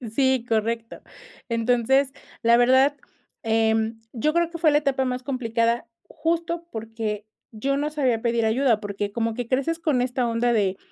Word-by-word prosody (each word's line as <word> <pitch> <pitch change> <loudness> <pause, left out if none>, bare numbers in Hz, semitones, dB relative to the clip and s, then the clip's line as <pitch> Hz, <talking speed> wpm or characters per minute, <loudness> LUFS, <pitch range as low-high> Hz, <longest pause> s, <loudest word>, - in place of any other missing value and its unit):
Sí, 260 -3 +2
correcto, 230 0 -2 0.5
entonces, 245 +4 +2 0.3
la 235 0 +5
verdad, 260 +4 +4 0.5
em, 225 0 +1
yo 300 +6 0
creo 340 -1 +2
que 340 - -7
fue 315 -2 +4
la 295 - +4
etapa 275 -2 +1
más 250 0 -3
complicada, 235 -3 0 0.2
justo 335 +1 -2
porque, 220 -2 -4 0.3
yo 275 +6 -1
no 295 +1 -1
sabía 260 -7 0
pedir 235 -1 +1
ayuda, 230 0 +2
porque 205 -1 -4
como 230 0 -1
que 245 0 -4
creces 275 +6 0
con 285 -7 +1
esta 245 -1 -1
onda 235 +1 +1
de, 195 -3 +1
240 Hz, 160 wpm, -24 LUFS, 225-275 Hz, 0.5 s, la